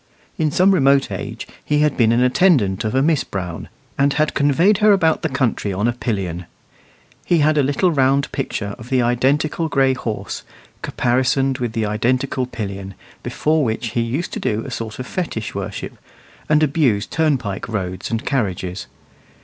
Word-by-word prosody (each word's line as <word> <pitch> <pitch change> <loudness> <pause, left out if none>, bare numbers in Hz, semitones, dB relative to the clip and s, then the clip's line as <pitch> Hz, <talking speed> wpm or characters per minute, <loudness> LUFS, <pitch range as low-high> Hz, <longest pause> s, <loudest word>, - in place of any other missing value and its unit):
In 155 -1 0
some 185 +6 +4
remote 140 -6 +3
age - - -6 0.2
he 150 0 +1
had 150 -2 +2
been 115 -3 +3
the 120 +2 +3
attendant 125 - +3
of 110 +2 -2
a 135 - +3
Miss 155 -1 +2
Brown, 90 -4 -6 0.3
and 140 0 +3
had 155 0 +1
conveyed 165 +9 +3
her 210 -1 +6
about 165 -5 +2
the 160 - -1
country 130 -7 -1
on 100 +4 0
a 120 - +1
pillion. 95 -8 -3 0.8
He 175 - +2
had 155 0 +3
a 150 - +4
little 145 +7 +1
round 140 -1 +2
picture 105 -6 -3
of 115 - -11
the 130 -2 +2
identical 140 +7 +1
gray 135 -2 +3
horse, 115 -4 -5 0.4
caparisoned 130 +2 +1
with 120 -3 -2
the 110 -2 -1
identical 125 +4 0
pillion, 100 -5 -6 0.3
before 155 0 0
which 115 -1 -2
he 120 - 0
used 125 +9 -3
to - - -3
do 110 +1 -1
a - - -7
sort 110 -2 -5
of 130 - -5
fetish 140 - -4
worship, 100 0 -5 0.5
and 150 0 +4
abuse 135 -9 +2
turnpike 130 -13 -1
roads 95 -4 -4
and 115 -1 -3
carriages. 95 - -2
130 Hz, 175 wpm, -20 LUFS, 110-150 Hz, 0.8 s, her